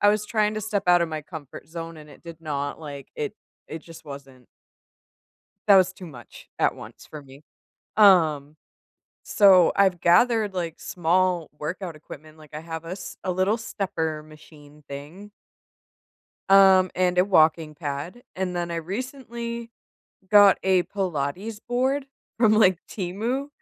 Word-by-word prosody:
I 205 Hz, -, +5 dB
was 210 Hz, 0 st, +2 dB
trying 215 Hz, -1 st, 0 dB
to 215 Hz, -, -3 dB
step 205 Hz, -2 st, -2 dB
out 175 Hz, -1 st, +5 dB
of 170 Hz, -, -1 dB
my 155 Hz, -1 st, -5 dB
comfort 150 Hz, -3 st, -10 dB
zone 165 Hz, 0 st, -7 dB
and 150 Hz, -1 st, -13 dB
it -, -, -17 dB
did 165 Hz, -1 st, -11 dB
not, 145 Hz, -3 st, -4 dB
like 140 Hz, -3 st, -9 dB
it 145 Hz, -, -4 dB, 0.3 s
it 160 Hz, 0 st, -7 dB
just 165 Hz, -1 st, -14 dB
wasn't 135 Hz, -3 st, -11 dB, 1.2 s
That 200 Hz, -, +8 dB
was 185 Hz, -1 st, +4 dB
too 185 Hz, -1 st, -11 dB
much 125 Hz, -7 st, -13 dB
at -, -, +2 dB
once -, -, -12 dB
for 150 Hz, -1 st, -10 dB
me. 135 Hz, +1 st, -16 dB, 0.5 s
Um, 155 Hz, -8 st, +4 dB, 0.7 s
so, 190 Hz, -4 st, +5 dB
I've 190 Hz, -3 st, +2 dB
gathered, 210 Hz, +4 st, +3 dB
like, 170 Hz, -3 st, -4 dB
small 175 Hz, -1 st, 0 dB
workout 170 Hz, +2 st, -5 dB
equipment, 155 Hz, +1 st, -13 dB
like, 155 Hz, -1 st, -16 dB
I 150 Hz, -, -5 dB
have 160 Hz, 0 st, -7 dB
a 165 Hz, -, -8 dB
s 190 Hz, +1 st, -7 dB
a 185 Hz, -, -1 dB
little 185 Hz, +5 st, +1 dB
stepper 165 Hz, -8 st, -4 dB
machine 150 Hz, -1 st, -17 dB
thing 150 Hz, +9 st, -10 dB, 1.2 s
um, 190 Hz, -1 st, +6 dB
and 180 Hz, 0 st, +1 dB
a 180 Hz, -, +5 dB
walking 160 Hz, -4 st, +3 dB
pad. 150 Hz, +9 st, -6 dB
And 185 Hz, -1 st, -2 dB
then 175 Hz, -1 st, -3 dB
I 170 Hz, -, -3 dB
recently 235 Hz, -, -6 dB, 0.6 s
got 205 Hz, -2 st, +7 dB
a 190 Hz, -1 st, +3 dB
Pilates 185 Hz, +2 st, -3 dB
board 265 Hz, +3 st, 0 dB, 0.3 s
from 220 Hz, -2 st, +4 dB
like, 190 Hz, -5 st, +4 dB
Temu, 225 Hz, +9 st, -3 dB
175 Hz, 155 wpm, -24 LUFS, 155-200 Hz, 1.2 s, That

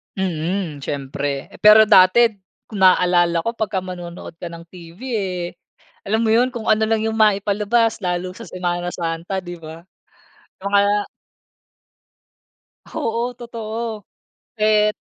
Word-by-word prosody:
Mm, 175 Hz, -3 st, -2 dB
siyempre. 140 Hz, 0 st, -4 dB
Pero 210 Hz, +1 st, +8 dB
dati 210 Hz, +2 st, +5 dB, 0.3 s
kung 210 Hz, -, -6 dB
naalala 175 Hz, -2 st, +4 dB
ko 230 Hz, -, -1 dB
pagka 210 Hz, -4 st, -1 dB
manonood 175 Hz, -2 st, -8 dB
ka 175 Hz, -, -5 dB
ng 170 Hz, 0 st, -10 dB
TV 170 Hz, 0 st, -13 dB, 0.2 s
eh, 185 Hz, -3 st, -3 dB, 0.6 s
alam 220 Hz, +3 st, +1 dB
mo 220 Hz, -, +2 dB
'yon, 240 Hz, +3 st, +4 dB
kung 230 Hz, -3 st, -6 dB
ano 215 Hz, 0 st, +3 dB
lang 220 Hz, 0 st, +1 dB
yung 220 Hz, 0 st, -1 dB
maipalabas 210 Hz, +2 st, +2 dB
lalo 180 Hz, -1 st, -2 dB
sa 185 Hz, -, -11 dB
Semana 175 Hz, -1 st, -3 dB
Santa, 170 Hz, +2 st, -3 dB
'di 175 Hz, -1 st, -8 dB
ba? 160 Hz, +1 st, -10 dB, 0.8 s
O 200 Hz, -, -3 dB
kaya 205 Hz, 0 st, +3 dB, 1.8 s
Oo, 235 Hz, +2 st, -2 dB
totoo. 225 Hz, -2 st, -6 dB, 0.5 s
Et 215 Hz, -1 st, +3 dB
195 Hz, 125 wpm, -20 LUFS, 175-220 Hz, 1.8 s, Pero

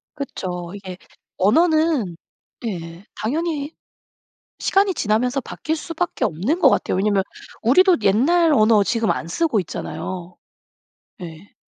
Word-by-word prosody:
그쵸. 180 Hz, -10 st, -5 dB
이게 190 Hz, -3 st, -8 dB, 0.4 s
언어는 310 Hz, -, +2 dB, 0.5 s
예 170 Hz, -4 st, -6 dB
당연히 300 Hz, +4 st, -2 dB, 0.9 s
시간이 390 Hz, 0 st, +2 dB
지나면서 245 Hz, +2 st, 0 dB
바뀔 315 Hz, +5 st, -4 dB
수밖에 330 Hz, -3 st, -3 dB
없는 210 Hz, -, -1 dB
것 -, -, +6 dB
같아요. -, -, 0 dB
왜냐하면 200 Hz, 0 st, +2 dB, 0.4 s
우리도 360 Hz, -, +5 dB
옛날 310 Hz, -, +3 dB
언어 215 Hz, -4 st, +5 dB
지금 225 Hz, +1 st, 0 dB
안 165 Hz, -, -3 dB
쓰고 240 Hz, -, 0 dB
있잖아요. 180 Hz, +1 st, -6 dB, 0.9 s
예. 170 Hz, +3 st, -10 dB
225 Hz, 255 characters per minute, -21 LUFS, -, 0.9 s, 것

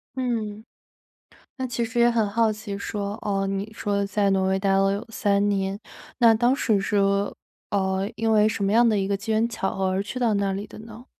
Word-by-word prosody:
嗯。 220 Hz, -5 st, -3 dB, 0.9 s
那 260 Hz, -1 st, -2 dB
其 235 Hz, -1 st, -2 dB
实 240 Hz, +1 st, -3 dB
也 235 Hz, -, +6 dB
很 230 Hz, -3 st, +1 dB
好 225 Hz, +1 st, +2 dB
奇 210 Hz, -1 st, -6 dB
说， 205 Hz, 0 st, -4 dB
哦， 195 Hz, -1 st, -1 dB
你 195 Hz, +2 st, -3 dB
说 200 Hz, -2 st, -1 dB
在 200 Hz, 0 st, +1 dB
挪 190 Hz, -1 st, +2 dB
威 190 Hz, 0 st, +1 dB
待 195 Hz, 0 st, +1 dB
了 195 Hz, 0 st, +3 dB
有 205 Hz, +4 st, -4 dB
3 205 Hz, -2 st, +1 dB
年。 195 Hz, 0 st, -1 dB, 0.4 s
那 230 Hz, -2 st, +7 dB
当 240 Hz, +4 st, +2 dB
时 220 Hz, -7 st, +1 dB
是， 200 Hz, +1 st, -1 dB, 0.7 s
呃， 190 Hz, 0 st, 0 dB
因 225 Hz, 0 st, 0 dB
为 215 Hz, -1 st, +5 dB
什 200 Hz, -2 st, -3 dB
么 195 Hz, -, +1 dB
样 235 Hz, +2 st, +5 dB
的 220 Hz, -2 st, +2 dB
一 195 Hz, -1 st, 0 dB
个 200 Hz, -, 0 dB
机 220 Hz, +3 st, -4 dB
缘 220 Hz, +1 st, +2 dB
巧 225 Hz, -4 st, -3 dB
合 190 Hz, 0 st, -1 dB
而 190 Hz, +1 st, 0 dB
去 210 Hz, +5 st, -6 dB
到 235 Hz, -3 st, +2 dB
那 200 Hz, -1 st, 0 dB
里 200 Hz, +2 st, -4 dB
的 210 Hz, -, -12 dB
呢？ 225 Hz, +2 st, -11 dB
205 Hz, 230 characters per minute, -24 LUFS, 195-225 Hz, 0.9 s, 那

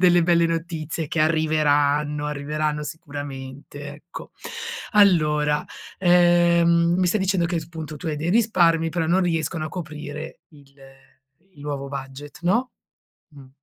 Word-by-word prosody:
delle 175 Hz, -1 st, +5 dB
belle 170 Hz, 0 st, +3 dB
notizie 165 Hz, -1 st, -3 dB
che 155 Hz, -, -2 dB
arriveranno, 150 Hz, -2 st, +2 dB
arriveranno 150 Hz, +1 st, -2 dB
sicuramente, 145 Hz, -2 st, -8 dB
ecco. 150 Hz, +4 st, -11 dB, 0.6 s
Allora, 150 Hz, -8 st, +3 dB, 0.3 s
ehm, 175 Hz, -1 st, +4 dB
mi 185 Hz, 0 st, +2 dB
stai 195 Hz, +4 st, +1 dB
dicendo 190 Hz, -2 st, +1 dB
che, 175 Hz, 0 st, -2 dB
appunto, 160 Hz, -1 st, -6 dB
tu 170 Hz, -, -8 dB
hai 155 Hz, -2 st, -1 dB
dei 160 Hz, +4 st, -2 dB
risparmi, 175 Hz, -7 st, +3 dB
però 165 Hz, 0 st, -1 dB
non 175 Hz, +4 st, +3 dB
riescono 165 Hz, -3 st, -1 dB
a -, -, -6 dB
coprire 155 Hz, -2 st, -7 dB
il 140 Hz, -3 st, -20 dB, 0.8 s
il 145 Hz, -, -17 dB
nuovo 140 Hz, -2 st, -4 dB
budget, 135 Hz, +1 st, -8 dB
no? 230 Hz, +9 st, +1 dB, 0.6 s
Mh. 135 Hz, -2 st, -13 dB
155 Hz, 130 wpm, -23 LUFS, 145-170 Hz, 0.8 s, delle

